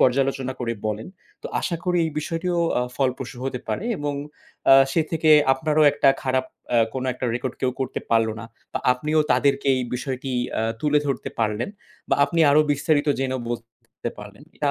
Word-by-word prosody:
পর্যালোচনা 135 Hz, 0 st, +2 dB
করে 115 Hz, -1 st, -1 dB
বলেন 105 Hz, +1 st, -3 dB, 0.4 s
তো -, -, -4 dB
আশা 170 Hz, -, -1 dB
করি 180 Hz, -1 st, +1 dB
এই 160 Hz, -, -3 dB
বিষয়টি 165 Hz, +3 st, -3 dB
ও -, -, +2 dB, 0.4 s
ফলপ্রসূ 130 Hz, -2 st, -2 dB
হতে 130 Hz, -2 st, -2 dB
পারে 215 Hz, -, -2 dB
এবং 145 Hz, 0 st, -2 dB, 0.6 s
আ -, -, +10 dB, 0.2 s
সে 165 Hz, -, +3 dB
থেকে 160 Hz, -1 st, +2 dB, 0.2 s
আপনারও 155 Hz, +3 st, +1 dB
একটা -, -, +3 dB
খারাপ 130 Hz, -1 st, +1 dB, 0.3 s
আ -, -, +5 dB, 0.2 s
কোনো 130 Hz, 0 st, -2 dB
একটা 125 Hz, -, -6 dB
record 125 Hz, +1 st, -3 dB
কেউ 130 Hz, -, +1 dB
করতে 130 Hz, -, -2 dB
পারলো 115 Hz, -1 st, +3 dB
না -, -, -7 dB, 0.3 s
বা -, -, -1 dB
আপনিও 150 Hz, +5 st, 0 dB
তাদেরকে 140 Hz, -1 st, +2 dB
এই 130 Hz, -, -1 dB
বিষয়টি 130 Hz, +1 st, -4 dB, 0.3 s
আ -, -, 0 dB, 0.2 s
তুলে 150 Hz, -1 st, +3 dB
ধরতে 135 Hz, -3 st, -2 dB
পারলেন 110 Hz, +1 st, 0 dB, 0.4 s
বা -, -, +3 dB
আপনি 165 Hz, +3 st, -1 dB
আরও 150 Hz, +2 st, +6 dB
বিস্তারিত 145 Hz, +1 st, +1 dB
জেনেও 130 Hz, -1 st, -1 dB
বলতে 115 Hz, -1 st, -7 dB
পারলেন। -, -, -11 dB
এটা -, -, +1 dB
135 Hz, 180 wpm, -23 LUFS, 125-150 Hz, 0.6 s, আ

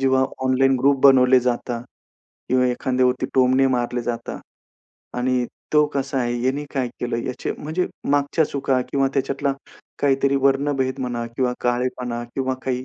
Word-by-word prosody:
जेव्हा 130 Hz, 0 st, +3 dB, 0.2 s
online 130 Hz, +1 st, +3 dB
group 140 Hz, +1 st, +3 dB
बनवले 130 Hz, -1 st, +6 dB
जातात 120 Hz, -1 st, -2 dB, 0.7 s
किंवा 125 Hz, 0 st, +3 dB
एखाद्यावरती 125 Hz, 0 st, 0 dB
टोमणे 130 Hz, +1 st, +4 dB
मारले 120 Hz, -1 st, -1 dB
जातात 120 Hz, -1 st, -4 dB, 0.8 s
आणि 125 Hz, 0 st, +1 dB, 0.3 s
तो 150 Hz, -1 st, +5 dB
कसा 135 Hz, 0 st, -1 dB
आहे? 120 Hz, -1 st, -1 dB
यांनी 135 Hz, +3 st, 0 dB
काय 130 Hz, -2 st, 0 dB
केलं? 120 Hz, -1 st, -2 dB
याचे 130 Hz, -, -3 dB
म्हणजे 160 Hz, +5 st, -2 dB, 0.2 s
मागच्या 145 Hz, +3 st, +2 dB
चुका 135 Hz, -2 st, 0 dB
किंवा 135 Hz, -1 st, +2 dB
त्याच्यातला 140 Hz, +1 st, 0 dB, 0.5 s
काहीतरी 140 Hz, 0 st, +2 dB
वर्णभेद 135 Hz, -1 st, +1 dB
म्हणा 120 Hz, -2 st, -3 dB
किंवा 125 Hz, +2 st, -1 dB
काळेपणा 120 Hz, -1 st, -1 dB
किंवा 130 Hz, -1 st, -1 dB
काही 130 Hz, -1 st, -2 dB
130 Hz, 140 wpm, -22 LUFS, 125-135 Hz, 0.8 s, बनवले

